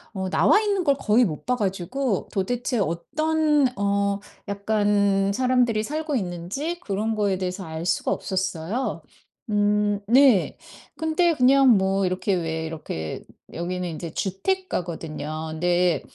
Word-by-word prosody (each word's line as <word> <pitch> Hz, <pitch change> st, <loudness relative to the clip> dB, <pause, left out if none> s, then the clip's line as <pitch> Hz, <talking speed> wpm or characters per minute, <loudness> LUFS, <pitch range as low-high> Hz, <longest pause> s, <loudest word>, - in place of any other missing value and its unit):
어 190 Hz, 0 st, -2 dB
나와있는 410 Hz, -, +3 dB
걸 280 Hz, -4 st, +3 dB
거의 225 Hz, +4 st, +3 dB
못 155 Hz, -7 st, -5 dB
봐 250 Hz, -, +1 dB
가지고 200 Hz, +3 st, -2 dB
도대체 240 Hz, +4 st, -1 dB
어떤 300 Hz, -, +1 dB
어 200 Hz, 0 st, +1 dB, 0.3 s
약간 200 Hz, -1 st, +1 dB
사람들이 245 Hz, -2 st, +2 dB
살고 305 Hz, +3 st, -3 dB
있는지 200 Hz, -, -3 dB
그런 215 Hz, -, -2 dB
거에 200 Hz, -3 st, 0 dB
대해서 185 Hz, +1 st, -4 dB
알 160 Hz, +1 st, -6 dB
수가 -, -, 0 dB
없었어요. 190 Hz, +4 st, -2 dB, 0.5 s
음 205 Hz, 0 st, +2 dB
네. 255 Hz, -4 st, +5 dB, 0.4 s
근데 320 Hz, +1 st, +2 dB
그냥 265 Hz, +1 st, +5 dB
뭐 190 Hz, 0 st, +1 dB
이렇게 185 Hz, +2 st, -1 dB
왜 160 Hz, -2 st, -2 dB
이렇게 80 Hz, -, -5 dB, 0.3 s
여기는 180 Hz, +1 st, -3 dB
인제 165 Hz, 0 st, -6 dB
주택가거든요. 165 Hz, -, -3 dB
네. 175 Hz, -3 st, +2 dB
200 Hz, 260 characters per minute, -24 LUFS, 180-255 Hz, 0.5 s, 네